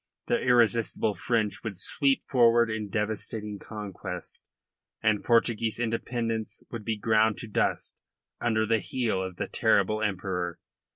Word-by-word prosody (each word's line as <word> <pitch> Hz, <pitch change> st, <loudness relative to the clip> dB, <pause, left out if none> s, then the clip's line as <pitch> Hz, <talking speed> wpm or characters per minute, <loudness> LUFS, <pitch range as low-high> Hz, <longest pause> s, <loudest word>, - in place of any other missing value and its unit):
The 240 Hz, -1 st, +1 dB
irresistible 115 Hz, -3 st, +3 dB
French 105 Hz, -3 st, -1 dB
would 105 Hz, -5 st, -5 dB
sweep 135 Hz, -, +1 dB
forward 120 Hz, -3 st, +4 dB
in 110 Hz, -2 st, -3 dB
devastating 105 Hz, 0 st, -3 dB
conquest, 105 Hz, -4 st, -7 dB, 0.6 s
and 110 Hz, -1 st, +1 dB
Portuguese 115 Hz, -1 st, +2 dB
independence 115 Hz, -1 st, -2 dB
would 115 Hz, -3 st, -5 dB
be 110 Hz, 0 st, -1 dB
ground 110 Hz, 0 st, +3 dB
to 115 Hz, -, -6 dB
dust 105 Hz, -, -1 dB, 0.4 s
under 110 Hz, -2 st, +1 dB
the 115 Hz, 0 st, +2 dB
heel 110 Hz, -2 st, -1 dB
of 95 Hz, -1 st, -5 dB
the -, -, -3 dB
terrible 110 Hz, 0 st, +2 dB
Emperor. 90 Hz, -4 st, -2 dB
110 Hz, 130 wpm, -28 LUFS, 105-115 Hz, 0.6 s, forward